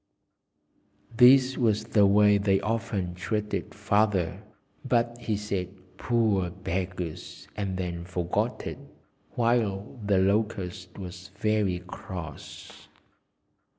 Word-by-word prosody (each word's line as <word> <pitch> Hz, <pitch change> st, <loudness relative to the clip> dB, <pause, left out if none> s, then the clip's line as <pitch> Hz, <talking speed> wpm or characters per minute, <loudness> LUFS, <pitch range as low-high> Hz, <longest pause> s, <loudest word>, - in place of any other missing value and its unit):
This 130 Hz, +2 st, +6 dB
was 110 Hz, -3 st, +2 dB
the 105 Hz, -3 st, +4 dB
way 105 Hz, 0 st, +5 dB
they 100 Hz, -1 st, +2 dB
often 105 Hz, -5 st, -2 dB
treated 105 Hz, +5 st, -3 dB
Father, 105 Hz, -4 st, +1 dB, 0.4 s
but 120 Hz, 0 st, +1 dB
he 110 Hz, -3 st, -1 dB
said 100 Hz, -2 st, -4 dB, 0.2 s
"Poor 110 Hz, -7 st, +1 dB
beggars!" 90 Hz, -2 st, -5 dB
and 95 Hz, -3 st, -3 dB
then 85 Hz, -2 st, -4 dB
forgot 90 Hz, -1 st, -2 dB
it, -, -, -5 dB, 0.6 s
while 115 Hz, -2 st, 0 dB
the 100 Hz, -1 st, +2 dB
Locust 95 Hz, -2 st, -1 dB
was 90 Hz, -1 st, -8 dB
very 105 Hz, -5 st, 0 dB
cross. 90 Hz, -2 st, -9 dB
100 Hz, 100 wpm, -27 LUFS, 90-110 Hz, 0.6 s, This